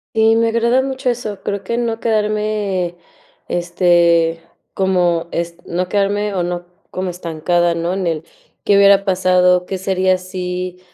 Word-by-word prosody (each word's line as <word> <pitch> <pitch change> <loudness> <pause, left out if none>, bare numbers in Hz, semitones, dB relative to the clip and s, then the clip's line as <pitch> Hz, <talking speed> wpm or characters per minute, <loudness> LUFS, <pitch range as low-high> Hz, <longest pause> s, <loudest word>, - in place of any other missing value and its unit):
Sí, 220 0 +4
me 230 0 +2
agrada 235 +3 +2
mucho 265 -1 -1
eso, 215 -5 -6
creo 200 -1 -3
que 235 +5 -2
no 230 -2 -1
quedarme, 210 -5 -1 0.5
este, 170 -1 +2 0.3
como 175 -3 +1
est 170 0 -4
no 180 +2 -2
quedarme 205 +1 0
o 185 - -1
no 175 0 -3 0.2
como 185 0 -3
estancada, 170 0 0
¿no?, 170 +2 -2
en 190 -2 -2
el 160 -2 -2 0.4
qué 200 - +3
hubiera 200 0 +5
pasado, 180 -1 +3
qué 190 - -3
sería 185 0 +1
si, 180 -1 -5
185 Hz, 150 wpm, -18 LUFS, 175-210 Hz, 0.5 s, hubiera